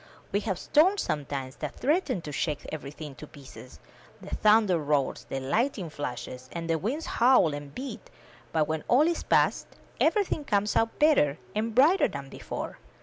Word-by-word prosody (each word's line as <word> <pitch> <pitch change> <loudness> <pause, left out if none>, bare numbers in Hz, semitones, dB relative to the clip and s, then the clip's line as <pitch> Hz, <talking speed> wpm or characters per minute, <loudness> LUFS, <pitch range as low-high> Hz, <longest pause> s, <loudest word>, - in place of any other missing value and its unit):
We 200 - +1
have 200 -3 -2
storms 370 - +3
sometimes 140 -3 -4
that 150 -2 -5
threaten 285 - 0
to 150 - -6
shake 145 0 -2
everything 150 0 -7
to 150 - -9
pieces— 135 -3 -13 0.4
the - - -10
thunder 210 -5 +4
roars, 145 -2 -1
the 135 - -2
light 225 - 0
ning 175 -6 -5
flashes, 125 -2 -6
and 170 -1 -5
the 165 -1 +1
winds 275 - -2
howl 235 - +4
and 145 -1 -7
beat; 275 - -7 0.4
but, 155 -2 +1
when 160 -1 -2
all 255 +5 +5
is 340 - 0
past, - - +2 0.3
everything 400 -7 +2
comes 210 -5 0
out 225 0 +1
better 290 - +4 0.2
and 220 +1 -2
brighter 310 +10 +5
than - - -7
before. - - -6
170 Hz, 170 wpm, -28 LUFS, -, 0.4 s, all